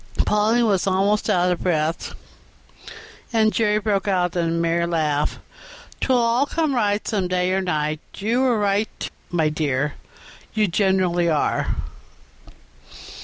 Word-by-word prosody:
Polly 220 Hz, +3 st, +2 dB
was 200 Hz, -4 st, +1 dB
almost 195 Hz, +3 st, +1 dB
out 180 Hz, 0 st, +2 dB
of 180 Hz, -, -2 dB
breath, 160 Hz, -2 st, -1 dB, 1.2 s
and 220 Hz, -2 st, +2 dB
Jerry 210 Hz, -2 st, +2 dB
broke 205 Hz, -2 st, -1 dB
out 180 Hz, -3 st, +1 dB
into 170 Hz, -2 st, 0 dB
a 165 Hz, -, -1 dB
merry 170 Hz, 0 st, +1 dB
laugh. 155 Hz, -3 st, 0 dB, 0.6 s
"''Twill 260 Hz, -2 st, +2 dB
all 235 Hz, +3 st, +2 dB
come 315 Hz, -2 st, 0 dB
right 210 Hz, -4 st, 0 dB
some 200 Hz, -5 st, 0 dB
day 180 Hz, 0 st, 0 dB
or 190 Hz, +1 st, +1 dB
night': 155 Hz, -4 st, -1 dB, 0.2 s
you 230 Hz, +5 st, 0 dB
were 250 Hz, -3 st, +2 dB
right, 205 Hz, +1 st, -1 dB, 0.2 s
my 165 Hz, -3 st, +1 dB
dear; 150 Hz, -2 st, -1 dB, 0.6 s
you 215 Hz, -1 st, +2 dB
generally 180 Hz, -2 st, +1 dB
are. 155 Hz, -2 st, 0 dB
190 Hz, 135 wpm, -22 LUFS, 170-215 Hz, 1.2 s, Polly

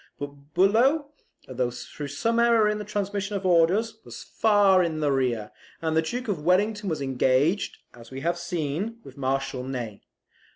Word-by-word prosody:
But 145 Hz, +1 st, -9 dB
Bulow, 250 Hz, -, +3 dB, 0.4 s
through 125 Hz, +2 st, -4 dB
some 230 Hz, +12 st, 0 dB
error 235 Hz, -2 st, +4 dB
in 210 Hz, 0 st, 0 dB
the -, -, -4 dB
transmission 205 Hz, 0 st, -3 dB
of 195 Hz, -1 st, -3 dB
orders, 185 Hz, +6 st, +3 dB
was -, -, -9 dB
far 205 Hz, -4 st, +4 dB
in 165 Hz, -3 st, -1 dB
the 150 Hz, -2 st, +1 dB
rear; 125 Hz, -5 st, 0 dB, 0.3 s
and 160 Hz, -1 st, -1 dB
the 160 Hz, -, +4 dB
Duke 245 Hz, +10 st, -4 dB
of 190 Hz, -8 st, -2 dB
Wellington 205 Hz, +4 st, +2 dB
was 155 Hz, -4 st, -2 dB
engaged, 135 Hz, +7 st, +1 dB, 0.2 s
as 115 Hz, -1 st, -14 dB
we 135 Hz, 0 st, -7 dB
have 170 Hz, +3 st, -1 dB
seen, 170 Hz, +5 st, -3 dB
with 135 Hz, -, -13 dB
Marshal 135 Hz, -1 st, -2 dB
Ney. 120 Hz, -6 st, -5 dB
170 Hz, 165 wpm, -26 LUFS, 135-205 Hz, 0.4 s, error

